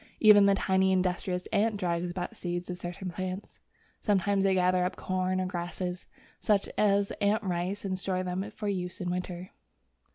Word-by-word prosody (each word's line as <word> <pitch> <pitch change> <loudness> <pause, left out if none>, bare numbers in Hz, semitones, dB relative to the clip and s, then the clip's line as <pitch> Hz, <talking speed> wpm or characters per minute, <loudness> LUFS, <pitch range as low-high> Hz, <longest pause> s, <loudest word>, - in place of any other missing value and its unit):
Even 205 -2 +8
the 200 - +5
tiny, 190 0 +2
industrious 180 -1 0
ant 215 +1 +2
drags 175 -2 -1
about 175 0 -4
seeds 175 0 -4
of 180 - -5
certain 180 +1 -5
plants. 185 +2 -5 0.4
Sometimes 200 -1 +2
they 195 -1 +3
gather 180 0 +3
up 180 - -1
corn 185 0 -1
or 185 - 0
grasses, 180 0 -4 0.3
such 205 -2 +2
as 200 -1 +2
ant 210 +2 +2
rice, 185 +2 -2
and 185 -1 -2
store 185 -1 -1
them 185 +3 -3
for 210 - -4
use 180 -3 -2
in 180 -1 -2
winter. 180 0 -4
185 Hz, 170 wpm, -29 LUFS, 180-195 Hz, 0.4 s, Even